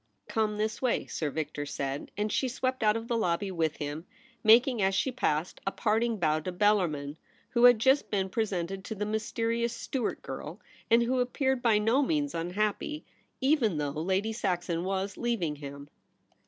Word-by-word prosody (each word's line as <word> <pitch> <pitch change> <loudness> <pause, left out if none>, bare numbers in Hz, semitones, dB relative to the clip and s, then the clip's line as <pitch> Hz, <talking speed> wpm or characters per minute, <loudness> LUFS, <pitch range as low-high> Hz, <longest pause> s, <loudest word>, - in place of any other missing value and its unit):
' - - -47
Come 215 -1 0
this 215 +1 -2
way,' 255 -2 +1
Sir 155 - -3
Victor 150 -1 -3
said, 140 0 -4
and 210 +1 -1
she 265 - +1
swept 255 +1 -2
out 215 0 +3
of 230 0 -6
the 235 - 0
lobby 195 -2 0
with 160 -4 -1
him, 150 +2 -5 0.4
making, 235 +1 +6
as 190 0 +2
she 260 +7 +1
passed, 160 -9 -1
a - - +2
parting 225 +2 +1
bow 155 -4 +2
to 185 +4 -4
Bellarmin, 175 -7 +1 0.3
who 240 0 +4
had 245 -1 +8
just 265 +5 +3
been 195 -2 0
presented 190 -3 -2
to 220 - -5
the 210 +1 -2
mysterious 230 +2 -1
Stuart 245 -1 -3
girl, - - -7 0.3
and 235 +1 +5
who 255 +2 +1
appeared 265 +1 0
by 230 -3 +4
no 225 +6 +3
means 290 0 0
unhappy, 205 - -2 0.4
even 260 - +2
though 145 -1 -1
Lady 190 +8 -1
Saxon 175 -6 -1
w^as 190 +2 -2
leav 235 -5 0
ing 150 -3 -2
him. 140 0 -8
210 Hz, 180 wpm, -29 LUFS, 170-235 Hz, 0.4 s, had